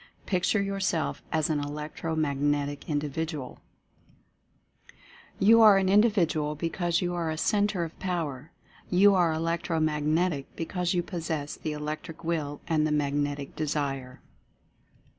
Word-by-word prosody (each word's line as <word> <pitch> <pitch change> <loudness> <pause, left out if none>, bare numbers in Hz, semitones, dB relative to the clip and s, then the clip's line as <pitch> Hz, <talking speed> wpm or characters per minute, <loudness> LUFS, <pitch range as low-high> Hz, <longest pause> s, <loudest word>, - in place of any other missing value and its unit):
Picture 185 +3 +1
yourself 195 -4 -1
as 160 0 +1
an 150 - +1
Electro 150 +3 -4
Magnetic 145 -1 -1
Individual 150 -1 -3 1.8
You 225 +3 +6
are 210 -3 +8
an 190 -1 +2
Individual 175 -8 +3
because 170 +2 -1
you 175 0 -1
are 170 -2 -1
a 155 - -3
Centre 205 0 +1
of 165 -1 -8
Power. 160 -6 -3 0.4
You 200 +3 +6
are 175 -3 +3
Elec 165 +1 -1
tro 165 -2 -1
Magnetic 155 0 0
because 180 +2 -2
you 175 - +1
possess 160 -5 -4
the 155 - -4
Electric 150 +2 -6
Will 155 -3 -2
and 155 -2 +2
the - - -2
Magnetic 145 -1 -1
Desire. 140 -4 -3
160 Hz, 130 wpm, -28 LUFS, 145-175 Hz, 1.8 s, are